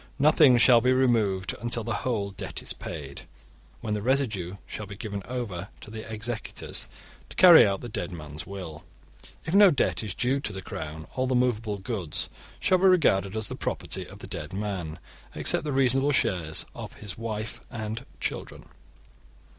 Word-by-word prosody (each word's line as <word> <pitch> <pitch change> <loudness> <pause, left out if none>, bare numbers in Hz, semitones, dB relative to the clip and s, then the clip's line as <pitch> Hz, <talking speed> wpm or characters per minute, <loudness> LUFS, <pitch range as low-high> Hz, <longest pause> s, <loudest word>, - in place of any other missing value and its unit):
Nothing 145 -3 +6
shall 120 0 +7
be 125 +2 +4
removed 110 -8 +2
until 120 -1 -2
the 115 +1 -2
whole 105 -6 -1
debt 95 - -6
is - - -5
paid, 70 -4 -7 0.5
when 110 -2 -2
the 105 - -1
residue 110 -8 0
shall 105 - -6
be 100 0 -9
given 105 -3 -4
over 105 -8 -4
to 105 - -11
the 110 0 -7
executors 110 +1 -3 0.4
to - - -11
carry 175 - +9
out 100 -1 -1
the 120 - -6
dead 110 - -4
man's 75 -3 -7
will. 90 -6 -7 0.6
If 160 - -3
no 200 0 +8
debt 145 -7 +1
is 105 -4 -4
due 130 +3 +1
to 110 - -3
the 95 -2 -7
Crown, 80 -1 -6
all 130 0 0
the 130 - +1
movable 115 -4 +1
goods 95 -5 -3 0.3
shall 185 - +3
be 190 - +3
regarded 105 - +4
as 110 -2 0
the - - -3
property - - -3
of - - -11
the - - -10
dead - - -6
man, 95 -6 -3 0.4
except - - +3
the 150 - -1
reasonable 135 +1 +3
shares 85 - +1
of - - -8
his 105 -3 -7
wife 110 -1 -5
and 110 +2 -5 0.2
children. - - -4
110 Hz, 180 wpm, -27 LUFS, 95-125 Hz, 0.6 s, carry